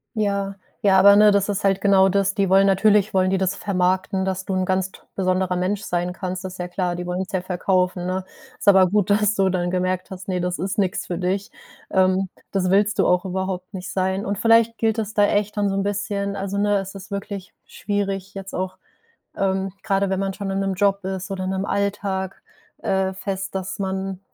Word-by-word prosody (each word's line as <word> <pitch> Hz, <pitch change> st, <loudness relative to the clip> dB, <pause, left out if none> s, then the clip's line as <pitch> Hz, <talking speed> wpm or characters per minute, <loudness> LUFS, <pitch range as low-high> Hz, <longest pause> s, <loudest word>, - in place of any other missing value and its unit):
Ja, 200 Hz, -2 st, -1 dB, 0.3 s
ja, 190 Hz, -2 st, +5 dB
aber 200 Hz, +1 st, +8 dB
ne, 210 Hz, 0 st, +7 dB
das 200 Hz, 0 st, +2 dB
ist 200 Hz, -, -1 dB
halt 195 Hz, 0 st, +2 dB
genau 195 Hz, -1 st, +5 dB
das. 195 Hz, +1 st, +1 dB
Die 200 Hz, -2 st, +2 dB
wollen 195 Hz, +1 st, +5 dB
natürlich 205 Hz, +1 st, +3 dB
wollen 185 Hz, 0 st, +3 dB
die 195 Hz, -, +1 dB
das 190 Hz, +1 st, 0 dB
vermarkten, 190 Hz, 0 st, 0 dB
dass 190 Hz, 0 st, -2 dB
du 195 Hz, -, -2 dB
'n 185 Hz, 0 st, +1 dB
ganz 185 Hz, 0 st, 0 dB
t -, -, -15 dB, 0.2 s
besonderer 185 Hz, -1 st, 0 dB
Mensch 190 Hz, +3 st, -1 dB
sein 180 Hz, -3 st, -2 dB
kannst. 185 Hz, 0 st, -5 dB
Das 190 Hz, -1 st, -6 dB
ist -, -, -11 dB
ja 180 Hz, -, -3 dB
klar, 180 Hz, -1 st, -2 dB
die 180 Hz, 0 st, -5 dB
wollen's 185 Hz, +3 st, -3 dB
ja 185 Hz, -, -1 dB
verkaufen, 180 Hz, 0 st, 0 dB
ne? 185 Hz, +1 st, -2 dB, 0.4 s
Ist -, -, -8 dB
aber 190 Hz, -2 st, +7 dB
gut, 205 Hz, +1 st, +1 dB
dass 210 Hz, 0 st, +3 dB
du 195 Hz, -2 st, +2 dB
dann 175 Hz, -1 st, -1 dB
gemerkt 185 Hz, 0 st, -1 dB
hast: 190 Hz, +2 st, -8 dB
Ne, 185 Hz, -2 st, -1 dB
das 180 Hz, 0 st, -2 dB
ist 190 Hz, +1 st, -3 dB
nix 190 Hz, -3 st, 0 dB
für 175 Hz, -, -3 dB
dich. 190 Hz, +3 st, -1 dB, 0.4 s
Ähm, 190 Hz, 0 st, +2 dB, 0.2 s
das 185 Hz, -2 st, 0 dB
willst 205 Hz, +2 st, +2 dB
du -, -, +4 dB
auch 180 Hz, +1 st, +2 dB
überhaupt 190 Hz, +1 st, -3 dB
nicht 185 Hz, -1 st, -6 dB
sein. 190 Hz, +1 st, 0 dB
Und 200 Hz, 0 st, -2 dB
vielleicht 230 Hz, +1 st, +4 dB
gilt 225 Hz, 0 st, +1 dB
es 215 Hz, 0 st, -4 dB
da 205 Hz, -, +5 dB
echt 210 Hz, +1 st, 0 dB
dann 205 Hz, -, +2 dB
so -, -, -1 dB
'n 195 Hz, -, +1 dB
bisschen 200 Hz, 0 st, -2 dB
also 195 Hz, +1 st, -3 dB
ne, 205 Hz, 0 st, +2 dB
es 195 Hz, 0 st, -4 dB
ist 195 Hz, -1 st, -10 dB
wirklich 200 Hz, -1 st, -6 dB
schwierig, 195 Hz, -2 st, -3 dB
jetzt 195 Hz, 0 st, -7 dB
auch, 185 Hz, 0 st, -3 dB, 0.6 s
ähm, 190 Hz, -1 st, 0 dB
grade 195 Hz, -1 st, +1 dB
wenn 190 Hz, 0 st, -1 dB
man 195 Hz, 0 st, -1 dB
schon 200 Hz, 0 st, -5 dB
in 195 Hz, 0 st, -1 dB
'nem 195 Hz, 0 st, 0 dB
Job 200 Hz, 0 st, +1 dB
ist 190 Hz, 0 st, -4 dB
oder 185 Hz, -1 st, -3 dB
in 185 Hz, -, -2 dB
'nem 190 Hz, +1 st, -2 dB
Alltag, 195 Hz, -1 st, -2 dB, 0.4 s
äh, 190 Hz, 0 st, 0 dB
fest, 190 Hz, 0 st, -4 dB
dass 190 Hz, 0 st, -4 dB
man 190 Hz, -1 st, -3 dB
190 Hz, 225 wpm, -22 LUFS, 185-200 Hz, 0.6 s, aber